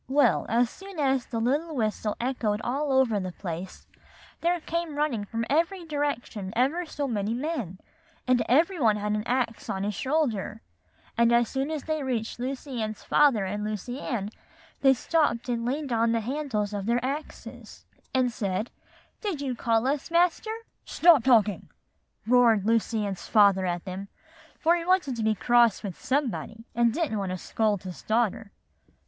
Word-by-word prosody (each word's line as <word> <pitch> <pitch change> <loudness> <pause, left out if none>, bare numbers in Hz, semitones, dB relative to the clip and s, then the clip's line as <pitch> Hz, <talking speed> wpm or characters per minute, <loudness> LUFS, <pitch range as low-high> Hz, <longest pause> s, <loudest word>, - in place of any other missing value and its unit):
Well, 285 +2 +3
as 235 +1 +2
soon 390 -1 -11
as 270 -3 +1
the 230 - -3
whistle 245 -5 -1
echoed 235 -4 -1
all 280 +3 -1
over 260 -6 +3
the 185 -1 -4
place, 175 0 -7 0.5
there 345 +1 +1
came 335 -1 -3
running 285 -8 -1
from 230 +2 -3
every 335 +4 0
direction 285 -10 -3
ever 295 +9 +1
so 290 -2 -3
many 215 -2 -1
men, 250 - -3 0.5
and 250 -1 +4
every 330 +8 +3
one 220 -5 +4
had 210 0 -2
an 210 0 0
axe 245 -3 -1
on 190 0 -2
his 210 +1 -1
shoulder; 235 -5 -1 0.6
and 235 0 +5
as 235 -1 +3
soon 270 +2 -2
as 310 -3 -3
they 310 -1 -2
reached 240 -4 -3
Lucy 260 -1 -4
Ann's 215 -1 -4
father 265 -9 +3
and 205 +2 -3
Lucy 215 +5 -4
Ann, 215 -8 -3 0.5
they 270 -1 +6
stopped 255 -4 0
and 235 -1 -1
leaned 275 +2 -2
on 230 0 +2
the 230 - +1
handles 230 -5 -2
of 200 0 -4
their 240 +1 +1
axes, 285 +4 -7 0.3
and 255 -2 +2
said, 205 -1 -2 0.5
'Did 395 -9 -2
you 275 -3 -2
call 230 -1 +1
us, 280 +3 -1
Master?' 345 +5 +2 0.3
"'Stop 330 -7 +5
talking,' 220 -6 +3 0.6
roared 230 -4 +4
Lucy 225 -1 +1
Ann's 195 -2 -5
father 200 -4 +4
at 175 +1 -3
them; 190 +1 -6 0.5
for 335 +2 +4
he 340 - -2
wanted 350 -7 +2
to 230 - -3
be 215 0 +2
cross 235 0 +3
with 195 -4 -7
somebody, 240 -4 -2
and 235 0 +3
he 230 - +1
didn't 280 -11 0
want 195 -2 -2
to 185 - -3
scold 210 0 -1
his 185 -2 -8
daughter. 220 -2 0
240 Hz, 170 wpm, -27 LUFS, 215-285 Hz, 0.6 s, they